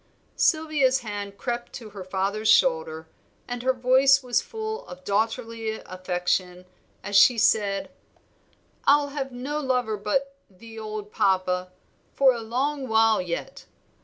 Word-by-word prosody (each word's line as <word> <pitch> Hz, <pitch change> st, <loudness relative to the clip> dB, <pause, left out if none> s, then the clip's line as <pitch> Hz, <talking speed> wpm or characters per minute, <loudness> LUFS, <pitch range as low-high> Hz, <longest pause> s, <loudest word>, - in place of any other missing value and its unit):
Sylvia's 305 Hz, -5 st, +2 dB
hand 205 Hz, -3 st, -6 dB
crept 240 Hz, +1 st, -4 dB
to 220 Hz, -4 st, -9 dB
her 200 Hz, -2 st, -8 dB
father's 195 Hz, +3 st, -1 dB
shoulder, 160 Hz, -10 st, +2 dB, 0.4 s
and 245 Hz, -1 st, -4 dB
her 260 Hz, +1 st, +2 dB
voice 260 Hz, +2 st, +4 dB
was 245 Hz, -1 st, +1 dB
full 440 Hz, +1 st, -5 dB
of 270 Hz, +1 st, -11 dB
daughterly 225 Hz, +1 st, -2 dB
affection, 180 Hz, 0 st, -2 dB, 0.4 s
as 205 Hz, -, -4 dB
she 230 Hz, +4 st, +7 dB
said 205 Hz, -3 st, +1 dB, 0.9 s
"I'll 285 Hz, 0 st, +4 dB
have 275 Hz, -2 st, -4 dB
no 265 Hz, +5 st, -4 dB
lover 250 Hz, -6 st, -1 dB
but 275 Hz, +7 st, -1 dB
'the 225 Hz, +4 st, -12 dB
old 215 Hz, -1 st, -6 dB
Papa' 185 Hz, -1 st, 0 dB, 0.4 s
for 270 Hz, -2 st, +5 dB
a 235 Hz, -, -5 dB
long 265 Hz, +5 st, -2 dB
while 220 Hz, -2 st, +3 dB
yet. 180 Hz, +10 st, -6 dB
225 Hz, 135 wpm, -25 LUFS, 200-265 Hz, 0.9 s, she